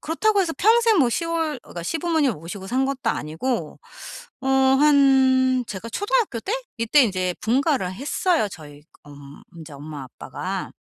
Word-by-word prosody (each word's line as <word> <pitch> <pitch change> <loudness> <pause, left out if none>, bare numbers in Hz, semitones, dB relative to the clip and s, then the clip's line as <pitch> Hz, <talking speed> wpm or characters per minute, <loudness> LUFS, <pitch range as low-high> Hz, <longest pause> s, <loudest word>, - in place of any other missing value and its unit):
그렇다고 400 +6 +1
해서 330 - -2
평생 450 0 +4
뭐 260 - +4
시월 325 0 -2
그러니까 170 - -9
시부모님을 320 - 0
모시고 180 +5 -8
산 255 +6 0
것도 270 -1 -2
아니고 165 - -3 0.6
어 - - -7 0.3
한 265 -3 +4
제가 210 +2 -7
초등학교 410 - -1
때? 400 - -4 0.3
이때 230 +6 +4
인제 185 -5 -1
분가를 255 - 0
했어요. 295 - 0
저희 150 -4 -12
그 - - -26
엄 140 0 -13
인제 160 -2 -11
엄마 145 0 -8
아빠가. 125 - -6
260 Hz, 325 characters per minute, -23 LUFS, -, 0.6 s, 평생